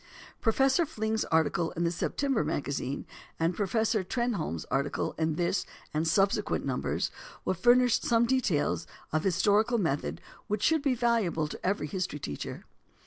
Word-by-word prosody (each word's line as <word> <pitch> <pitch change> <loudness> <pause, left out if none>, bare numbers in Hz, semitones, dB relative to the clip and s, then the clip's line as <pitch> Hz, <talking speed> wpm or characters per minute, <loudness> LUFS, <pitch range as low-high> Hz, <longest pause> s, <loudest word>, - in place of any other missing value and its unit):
Professor 265 +7 +3
Fling's 220 -7 -1
article 160 +1 +1
in 170 -1 -2
the 170 - +2
September 270 +8 0
MAGAZINE 140 -1 -2 0.3
and 165 +2 +1
Professor 220 +1 +1
Trenholme's 200 - -2
articles 140 +1 0
in 160 -1 +1
this 175 +3 0 0.3
and 155 +2 0
subsequent 195 +4 +2
numbers - - -1 0.3
will - - +2
furnish 240 +6 +4
some 235 0 +3
details 215 - +1 0.3
of 155 - +1
historical 205 +6 +3
method 160 -9 -1 0.3
which 210 0 -1
should 320 -2 +3
be 275 -3 +1
valuable 225 -10 +1
to - - -9
every 195 -3 0
history 180 0 -3
teacher. 75 - -6
195 Hz, 140 wpm, -29 LUFS, 160-235 Hz, 0.3 s, furnish